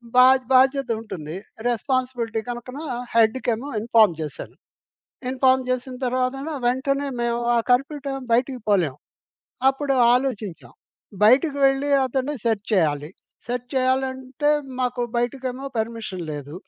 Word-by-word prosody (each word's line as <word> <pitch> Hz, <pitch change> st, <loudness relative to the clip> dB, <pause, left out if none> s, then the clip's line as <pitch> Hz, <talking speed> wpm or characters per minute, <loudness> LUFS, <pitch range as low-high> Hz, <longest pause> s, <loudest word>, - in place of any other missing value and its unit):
బా 250 Hz, -, +8 dB, 0.3 s
బాధ్యతుంటుంది. 230 Hz, -, +1 dB, 0.3 s
Responsibility 245 Hz, -2 st, -1 dB
కనుకన 245 Hz, +3 st, -6 dB, 0.4 s
హెడ్‌కేమో 230 Hz, +3 st, +2 dB
inform 220 Hz, -5 st, +4 dB
జేశాను. 150 Hz, -3 st, -6 dB, 0.7 s
Inform 260 Hz, 0 st, +3 dB
జేసిన 255 Hz, 0 st, -2 dB
తర్వాతన 255 Hz, +3 st, -1 dB, 0.2 s
వెంటనే 275 Hz, +3 st, 0 dB
మేము 235 Hz, 0 st, 0 dB
ఆ -, -, +4 dB
కర్ఫ్యూ 275 Hz, +4 st, +2 dB
టైమ్ 270 Hz, -1 st, -3 dB
బయటికి 250 Hz, +2 st, +1 dB
పోలేము. 175 Hz, -10 st, +2 dB, 0.7 s
అప్పుడు 275 Hz, 0 st, -1 dB, 0.2 s
ఆలోచించాం. 235 Hz, -8 st, -2 dB, 0.5 s
బయటికు 275 Hz, +6 st, +5 dB
వెళ్లి 270 Hz, +1 st, 0 dB, 0.2 s
అతన్ని 265 Hz, +3 st, -2 dB
సెర్చ్ 220 Hz, -3 st, 0 dB
చేయాలి. 150 Hz, -4 st, +1 dB, 0.4 s
సెర్చ్ 245 Hz, 0 st, -4 dB
చేయాలంటే, 260 Hz, +2 st, 0 dB, 0.3 s
మాకు 250 Hz, 0 st, -1 dB, 0.2 s
బయటకేమో 255 Hz, +2 st, -2 dB
పర్మిషన్ 220 Hz, -5 st, -4 dB
లేదు. 145 Hz, 0 st, -7 dB
250 Hz, 110 wpm, -23 LUFS, 225-265 Hz, 0.7 s, బా